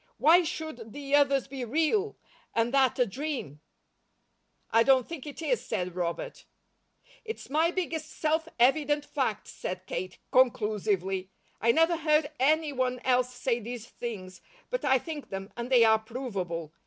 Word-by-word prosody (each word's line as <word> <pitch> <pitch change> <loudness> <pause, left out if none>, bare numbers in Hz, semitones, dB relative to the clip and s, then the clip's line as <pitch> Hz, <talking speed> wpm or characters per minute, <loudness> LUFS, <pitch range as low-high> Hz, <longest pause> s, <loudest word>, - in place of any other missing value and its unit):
Why 320 +9 +6
should 315 -10 -6
the 285 -1 -6
others 280 -2 +4
be 270 -1 -5
real, 325 - +1 0.4
and 230 +2 +1
that 265 -3 +3
a 250 - +4
dream?" 245 - -5 1.1
"I 225 - +5
don't 260 0 +4
think 315 -4 -7
it 295 +3 -7
is," - - 0
said 180 -5 -3
Robert. 170 -2 -4 0.8
"It's 445 -10 -7
my 320 +3 +3
biggest 330 -4 -3
self 320 +1 0
evident 290 +3 +3
fact," 255 -8 -2
said 185 0 -6
Kate, 185 -1 -5
conclusively. 205 -6 +1 0.3
"I 230 - +5
never 325 +6 +3
heard 305 -1 +2
any 305 +2 +2
one 255 -1 0
else 250 -1 +2
say 245 -1 -1
these 235 0 -7
things, 185 -6 -7 0.3
but - - -2
I 265 -2 +4
think 300 +2 -7
them, 195 +1 -6
and 240 +1 -5
they 250 -3 +6
are 220 -1 +5
provable. 195 - -5
255 Hz, 155 wpm, -29 LUFS, 220-305 Hz, 1.1 s, Why